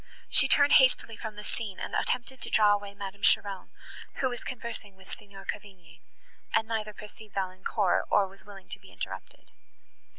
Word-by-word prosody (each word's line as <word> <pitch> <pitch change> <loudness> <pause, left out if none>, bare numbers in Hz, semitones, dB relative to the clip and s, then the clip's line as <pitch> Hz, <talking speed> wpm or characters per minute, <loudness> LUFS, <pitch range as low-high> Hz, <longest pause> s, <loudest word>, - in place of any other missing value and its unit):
She - - +7
turned 285 0 +5
hastily 255 -3 +2
from 220 -1 -7
the 210 - -8
scene, 210 -3 -5
and - - -5
attempted 250 +1 -1
to - - +1
draw 210 -1 +5
away 205 -1 -4
Madame 200 0 -7
Cheron, 200 -2 +3 0.5
who 260 - 0
was 245 - -6
conversing 230 -5 -7
with 190 0 -15
Signor 200 -1 -13
Cavigni, 185 -5 -8 0.5
and 220 - +2
neither 215 -2 -2
perceived 210 0 -13
Valancourt, 190 0 0
nor 200 -1 +4
was 195 +1 -10
willing 195 -1 -13
to - - -6
be - - -16
interrupted. - - -8
205 Hz, 170 wpm, -29 LUFS, 195-225 Hz, 0.5 s, She